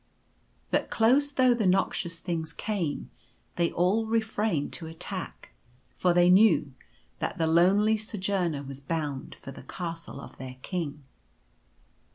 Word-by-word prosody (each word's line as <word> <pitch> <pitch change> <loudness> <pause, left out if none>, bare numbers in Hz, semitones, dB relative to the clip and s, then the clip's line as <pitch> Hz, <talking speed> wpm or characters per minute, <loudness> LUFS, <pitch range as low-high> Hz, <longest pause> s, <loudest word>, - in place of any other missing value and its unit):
But - - +1
close 265 +6 +3
though 255 -3 +4
the 225 -5 +1
noxious 180 -2 +1
things 160 -3 -3
came, 190 -9 -3 0.4
they 170 -1 +1
all 200 +6 +2
refrained 220 -8 0
to 165 - -3
attack; 175 +3 -6 0.4
for 180 - +1
they 175 0 +5
knew 185 -7 +5 0.5
that - - -2
the 165 - +1
lonely 190 +7 +4
So 215 0 -6
journer 180 -7 -1
was 135 0 -8
bound 145 -1 -3
for 135 - -10
the - - -10
Castle 165 0 -6
of - - -11
their 130 0 -7
King. 155 -6 -4
175 Hz, 140 wpm, -28 LUFS, 160-210 Hz, 0.5 s, they